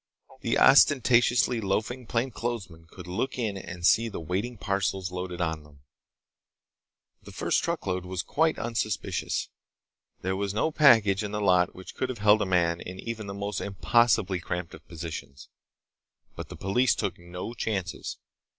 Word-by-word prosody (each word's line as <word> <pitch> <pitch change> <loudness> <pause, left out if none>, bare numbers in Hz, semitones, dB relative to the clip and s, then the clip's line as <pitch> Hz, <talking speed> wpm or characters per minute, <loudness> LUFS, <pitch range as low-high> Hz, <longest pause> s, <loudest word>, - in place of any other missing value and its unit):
The - - 0
ostentatiously 120 -3 +5
loafing 110 +5 -2
plainclothesmen 115 -9 -3
could 90 0 -11
look 95 +10 -3
in 110 -5 -1
and 85 -2 -6
see 115 +6 +4
the 100 - -6
waiting 95 +9 -3
parcels 100 -2 -1
loaded 90 -1 -5
on 80 -2 -1
them. 75 -2 -19 1.4
The - - -12
first - - 0
truckload 90 -1 -2
was 90 0 -3
quite 160 +1 +1
unsuspicious. 110 -3 -2 0.7
There 95 +1 0
was 100 +1 -2
no 160 +9 +1
package 110 -10 +5
in 105 0 -5
the 105 - -1
lot 90 -3 +3
which 95 - -10
could 130 - -2
have 130 - -4
held 105 +1 +4
a - - 0
man 85 -2 +2
in 90 +1 -8
even 115 -3 -5
the 100 - -6
most 100 0 -3
impossibly 100 -2 +2
cramped 90 -1 -4
of - - -13
positions. 80 -5 -8 0.9
But - - -7
the - - -8
police 120 +7 +2
took 100 -5 -3
no 90 +6 -7
chances. 100 -5 -3
100 Hz, 155 wpm, -27 LUFS, 90-115 Hz, 1.4 s, ostentatiously